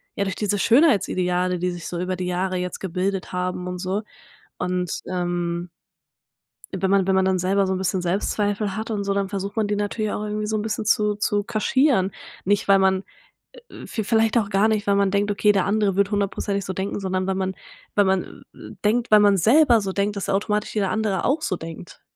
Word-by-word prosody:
ja, 200 - 0
durch 195 -1 -3
diese 205 -1 -1
Schönheitsideale, 185 - +2
die 180 0 -1
sich 175 -1 -7
so 175 - -4
über 185 +1 -2
die 180 - -4
Jahre 185 +1 -1
jetzt 180 0 -4
gebildet 190 +1 -3
haben 180 0 -2
und 180 0 -5
so. 190 +4 -2 0.6
Und, 180 -1 -1 0.2
ähm 175 -1 -2 1.1
wenn 190 0 0
man 195 -1 +3
wenn 190 - +2
man 190 0 +3
dann 190 -1 +2
selber 195 +2 +1
so 190 - 0
'n - - -2
bisschen 190 0 -1
Selbstzweifel 200 +2 -1
hat 220 +1 -4
und 205 -2 -2
so, 200 - 0
dann 195 -1 -1
versucht 200 +1 -4
man 220 - +1
die 210 - 0
natürlich 205 +1 -2
auch 210 - -3
irgendwie 210 0 -3
so 215 0 -1
'n 210 - -2
bisschen 215 0 -3
zu 210 -1 +2
zu 205 0 0
kaschieren, 230 -2 +2 0.3
nicht 205 +1 +2
weil 195 -1 +6
man 190 0 +2 0.5
äh - - -14
äh, - - -10
v 220 - -3
vielleicht 225 +2 +2
auch 210 -3 0
gar 200 +2 +3
nicht, 215 -2 0
weil 200 - +3
man 200 -1 +2
denkt: 200 +1 +1
„Okay, 205 +1 +3
der 195 -2 +1
andere 200 -1 +1
wird 200 0 +2
hundertprozentig 200 -1 -1
so 190 - -4
denken, 190 +2 -3
sondern 185 -1 -1
wenn 190 0 -1
man 190 0 -2 0.4
wenn 205 -1 +4
man, 190 -1 -1
äh, - - -11
denkt 235 +3 +1
wenn 215 -1 +7
man 205 -1 +5
selber 235 - +5
so 195 -1 -3
denkt, 200 +1 -1
dass 200 - -3
automatisch 210 +2 -1
jeder 200 -3 0
andere 215 -4 0
auch 300 +4 +1
so 185 - -1
denkt.“ 165 +1 -10
195 Hz, 220 wpm, -23 LUFS, 185-210 Hz, 1.1 s, wenn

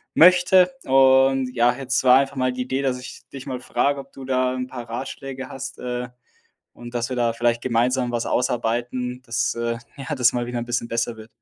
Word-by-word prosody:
möchte. 180 +4 +6
Und 135 0 +4
ja, 120 0 +3
jetzt 130 -1 -1
war 125 0 +7
einfach 140 0 -2
mal 130 0 +1
die 125 - -4
Idee, 130 +2 -2
dass 130 -2 -1
ich 125 - -9
dich 135 -1 -9
mal 130 -2 -4
frage, 140 +2 0
ob - - -11
du 135 - -9
da 130 -1 +1
'n 125 0 -3
paar 120 -2 -8
Ratschläge 130 +2 -6
hast, 135 0 -7
äh, 125 0 -4 0.6
und 120 0 -11
dass 120 0 -2
wir 130 - -3
da 120 -1 +1
vielleicht 120 0 0
gemeinsam 125 +1 +1
was 120 -1 -2
ausarbeiten, 125 +1 -1
dass, 115 -1 -1
äh, 115 0 -2 0.2
ja, 140 +2 -5
das 125 -3 +3
mal 120 -1 -1
wieder 120 0 -3
'n 120 - -4
bisschen 120 -1 -2
besser 115 0 -2
wird. 110 +1 -12
125 Hz, 210 wpm, -23 LUFS, 120-135 Hz, 0.6 s, war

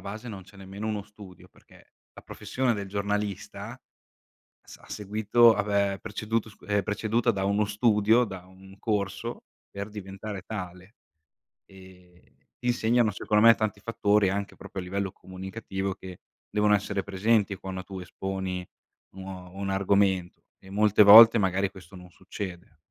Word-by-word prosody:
base 110 +4 -7
non 100 -3 -8
c'è 100 +2 -18
nemmeno 95 +2 -7
uno 105 -2 -2
studio, 100 -3 -15
perché - - -22 0.2
la - - -12
professione 130 -1 -2
del 100 -1 -5
giornalista, 100 0 -4 0.9
sa - - -14
ha - - -17
seguito 110 +3 +3
ha, 105 - 0
beh, 100 -1 0
preceduto 110 +2 -3
scu 110 - -16
è 105 -1 +1
preceduta 110 +3 0
da 95 -2 -3
uno 100 +2 +1
studio, 105 +2 +3
da 95 -5 -7
un 95 +1 -16
corso 105 +1 -3 0.3
per 100 +1 -6
diventare 100 -1 -7
tale. 90 0 -8 0.7
Ehm, 90 -2 -18 0.2
ti 125 - -8
insegnano 120 -2 +2
secondo 105 +2 +1
me 115 - +9
tanti 110 -3 -2
fattori, 105 -2 +2
anche 100 +1 -3
proprio 95 - -7
a 90 - -7
livello 95 +1 -3
comunicativo, 95 +1 -6
che 95 -1 -11 0.3
devono 105 0 +3
essere 100 -1 -1
presenti 100 +1 +1
quando 95 0 -7
tu 95 +1 -8
esponi 95 0 -5 0.5
uno 95 -1 -9
un 100 0 -4
argomento, 95 -2 +1 0.2
e 95 - -17
molte 105 +1 +4
volte 115 +3 +10
magari 95 -1 +1
questo 95 0 -15
non 90 0 -13
succede. 90 -3 -8
100 Hz, 150 wpm, -27 LUFS, 95-105 Hz, 0.9 s, volte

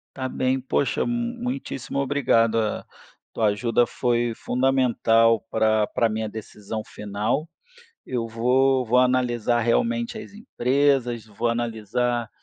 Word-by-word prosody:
Tá 130 -1 -3
bem, 130 0 0
poxa, 130 +1 -1
m 240 0 -2
muitíssimo 245 - -4
obrigado, 120 -5 +2
a 110 -1 -2 0.5
tua 110 - +1
ajuda 115 +3 +2
foi 120 -1 0
fundamental 115 -4 +2
pra 110 -1 +2
pra 115 - +1
minha 110 0 -2
decisão 110 0 -7
final, 105 +11 -3 0.6
eu 120 -2 -3
vou 125 +3 +2
vou 125 +2 +2
analisar 125 -2 +2
realmente 235 - 0
as 210 - -10
empresas, 130 - 0
vou 110 +2 -3
analisar, 120 +1 -1
120 Hz, 120 wpm, -24 LUFS, 115-135 Hz, 0.6 s, obrigado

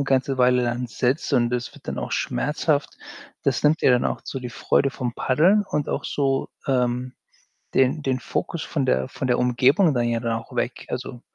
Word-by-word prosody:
'ne 140 - 0
ganze 135 0 +1
Weile 125 0 +4
dann 120 +1 -1
sitzt 130 +6 -1
und 120 -2 +2
es 125 0 -3
wird - - -16
dann - - -3
auch - - -4
schmerzhaft, - - -1 0.5
das - - 0
nimmt 155 +2 +3
dir - - +5
dann 125 -1 +3
auch - - -1
so 135 - -5
die 125 -1 -6
Freude 135 +3 +1
vom 125 -3 -4
Paddeln 185 +10 +3
und 150 -1 -1
auch - - -2
so, 135 -2 0 0.2
ähm, 125 -1 0 0.6
den 135 +4 +3
den 130 -1 0
Fokus 170 +5 -3
von 140 -4 -2
der 65 - +1
von 130 - -4
der 125 - +2
Umgebung 130 +7 +3
dann 120 -1 +1
ja 115 0 0
dann 115 -1 -1
auch 115 - -13
weg. - - -2
Also, 120 - -5
125 Hz, 205 wpm, -23 LUFS, 120-140 Hz, 0.6 s, dir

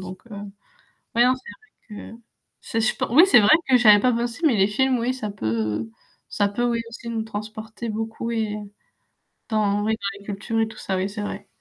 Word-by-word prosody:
Donc 185 0 -8
heu, - - -6 0.8
ouais, 240 +1 +5
non, 255 - +5
c'est 260 - -14
vrai - - -10
que, - - -11 0.4
c'est 225 - -2
je 220 - +2
pen - - -2
oui 325 +7 +8
c'est 245 - +7
vrai 305 +10 +6
que 255 -2 +5
j'avais 210 -3 +7
pas 250 +2 +3
pensé 235 +4 -2
mais 245 -7 +3
les 195 0 +4
films, 255 +4 +1
oui, 245 +2 -1
ça 215 -5 -4
peut 110 - -2 0.4
ça 205 -1 +1
peut, 225 +4 -2
oui, 235 -1 0
aussi 235 0 -9
nous 225 -1 -2
transporter 220 +1 -7
beaucoup, 225 +1 -4
oui. 220 -2 -1 0.9
Dans 205 -2 +1
oui 220 +1 +1
dans 200 -1 -5
les 200 - -17
cultures 215 +3 -3
et 225 - +2
tout 220 - -12
ça, 190 - -3
oui, 190 +2 -1
c'est 210 +1 -6
vrai. 205 0 -6
220 Hz, 215 wpm, -23 LUFS, 205-235 Hz, 0.9 s, oui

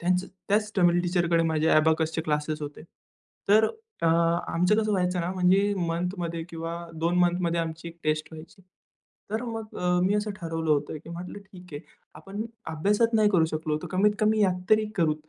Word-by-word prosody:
त्याच 180 +1 +1 0.2
त्याच 210 +1 +2
तमिल 175 -1 +4
टीचर 175 -1 +1
कडे 165 0 +4
माझे 160 0 +1
अबॅकस 160 +1 +3
चे - - 0
क्लासेस 150 0 -2
होते. 145 +1 -7 0.7
तर 215 +2 +6 0.4
अ, - - +3 0.4
आमचं 180 +5 +2
कसं 215 -1 +1
व्हायचं 180 -1 0
ना, 170 +1 -2
म्हणजे 190 +2 +3
मंथमध्ये 170 0 -3
किंवा 165 -1 -5 0.3
2 170 +2 +1
मंथमध्ये 175 -1 +2
आमची 165 +1 -5
एक 170 - -13
टेस्ट 155 0 0
व्हायची. 160 +5 -12 0.7
तर 220 +3 -2
मग 225 -2 -6
अ, 180 0 +1
मी 195 +2 +2
असं 210 0 -1
ठरवलं 165 -3 -3
होतं, 150 +1 0
की - - -12
म्हटलं 180 +4 -7
ठीक 190 -3 -15
आहे. 145 - -5 0.3
आपण 195 +7 -6 0.3
अभ्यासात 210 +8 +1
नाही 215 -1 +5
करू 175 -5 +4
शकलो 155 -1 -2
तर - - -5
कमीत 200 +3 +3
कमी 215 0 +3
यात 180 -2 +2
तरी 215 0 +5
करू 160 -4 +2
175 Hz, 185 wpm, -26 LUFS, 160-200 Hz, 0.7 s, तर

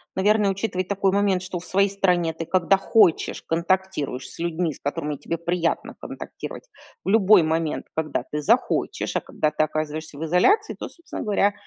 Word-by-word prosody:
наверное, 205 +1 +3
учитывать 190 -2 -2
такой 195 -1 +1
момент, 195 -2 +1
что 185 -2 -4
в 180 - -11
своей 195 +1 +2
стране 180 -4 +1
ты, 165 +1 -5
когда 185 +2 +3
хочешь, 195 -4 +3
контактируешь 170 -6 -1
с - - -10
людьми, 170 -1 -1
с - - -12
которыми 145 0 -3
тебе 170 - -4
приятно 170 0 -1
контактировать. - - -8 0.4
В - - -1
любой 205 -3 +6
момент, 160 0 -1
когда 160 -1 -1
ты 150 - -2
захочешь. 145 - +1
А - - -2
когда 155 0 -1
ты - - +1
оказываешься 155 -1 -4
в 160 - -5
изоляции, 395 - +3
то - - -4
собственно 340 - -8
говоря, 205 -1 +2
180 Hz, 175 wpm, -24 LUFS, 160-195 Hz, 0.4 s, любой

